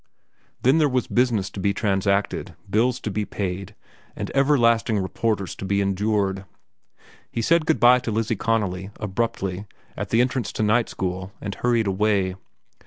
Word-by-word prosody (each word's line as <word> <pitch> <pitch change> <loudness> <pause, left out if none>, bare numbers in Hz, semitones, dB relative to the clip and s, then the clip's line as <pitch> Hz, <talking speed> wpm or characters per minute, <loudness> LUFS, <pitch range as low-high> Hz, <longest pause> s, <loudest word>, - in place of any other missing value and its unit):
Then 135 +6 +5
there 150 -2 +4
was 125 -2 0
business 115 -6 +1
to 100 - -7
be 100 +1 0
transacted, 100 -1 0
bills 120 +5 +1
to 105 - -3
be 105 +2 -1
paid, 100 0 -4 0.4
and - - -5
everlasting 120 -6 +3
reporters 100 -1 -1
to - - -7
be 100 +1 0
endured. 100 0 0 0.9
He 115 - -2
said 165 +3 +3
good 160 - +2
by 125 +1 +7
to 120 - -5
Lizzie 110 +1 0
Connolly, 95 -4 -1
abruptly, 100 -2 -2 0.3
at - - -4
the 115 - +2
entrance 125 -1 -1
to - - -1
night 115 +2 +2
school, 95 +1 -4
and 100 - -5
hurried 120 0 +1
away. 100 -1 +1
105 Hz, 160 wpm, -23 LUFS, 95-120 Hz, 0.9 s, by